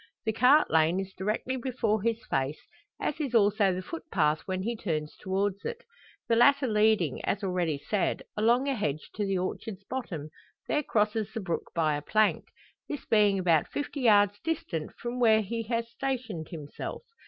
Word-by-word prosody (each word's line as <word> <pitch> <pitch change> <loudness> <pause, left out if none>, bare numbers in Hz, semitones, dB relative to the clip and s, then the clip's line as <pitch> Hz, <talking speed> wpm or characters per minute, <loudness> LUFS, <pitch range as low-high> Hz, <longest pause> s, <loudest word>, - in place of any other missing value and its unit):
The 220 - +1
cart 255 +7 +5
lane 160 +3 +3
is 190 0 -5
directly 215 +7 -2
before 230 -4 0
his 230 +1 -1
face, 135 +3 -1 0.4
as 300 - -2
is 275 -6 -2
also 205 -2 +4
the 185 +1 -3
footpath 160 - 0
when 185 -1 -2
he 235 +3 -1
turns 155 -8 -3
towards 195 +1 -2
it. 475 +1 -5 0.4
The 230 - +3
latter 280 +4 +5
leading, 215 - +2
as 205 +1 -1
already 180 -5 0
said, 195 +7 -1
along 235 +5 +3
a 275 - +2
hedge 155 - -3
to 210 - -2
the 195 -1 +1
orchard's 190 +2 -4
bottom, 180 - -5 0.4
there 300 - +1
crosses 215 -4 0
the - - -1
brook 180 -5 -3
by 155 -3 +2
a 145 - -3
plank 215 +7 +2 0.4
this 290 - -5
being 210 -3 +4
about 170 -5 +3
fifty 290 -1 -4
yards 205 -3 +4
distant 200 - -3
from 240 +1 -5
where 220 -2 +5
he 230 +3 -3
has 230 0 -2
stationed 240 -11 -3
himself. 150 - -7
210 Hz, 175 wpm, -29 LUFS, 180-235 Hz, 0.4 s, cart